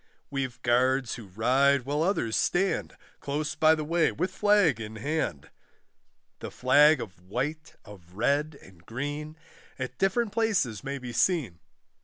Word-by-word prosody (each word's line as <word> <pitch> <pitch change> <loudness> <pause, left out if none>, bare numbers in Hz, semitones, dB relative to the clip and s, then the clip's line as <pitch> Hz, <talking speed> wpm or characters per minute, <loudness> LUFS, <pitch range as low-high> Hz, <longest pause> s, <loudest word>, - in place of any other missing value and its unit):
We've 130 -3 -3
guards 125 +1 +2
who 115 -5 -9
ride, 130 +7 +2
while 145 +4 -1
others 160 - 0
stand 190 +2 0 0.2
Close 150 +2 -3
by 155 0 +4
the 155 - -4
way 165 +2 +2
with 185 - -2
flag 195 - +3
in 110 0 -7
hand, 125 - -3 0.9
The - - -6
flag 145 +4 +4
of 95 -7 -8
white, 135 - -4
of 95 -4 -15
red, 140 +6 0
and 90 -3 -18
green, 145 - -5 0.4
At 130 -1 -6
different 205 +3 +1
places 200 - 0
may 140 0 -4
be 125 -2 -7
seen. 130 - +1
140 Hz, 145 wpm, -27 LUFS, 115-155 Hz, 0.9 s, by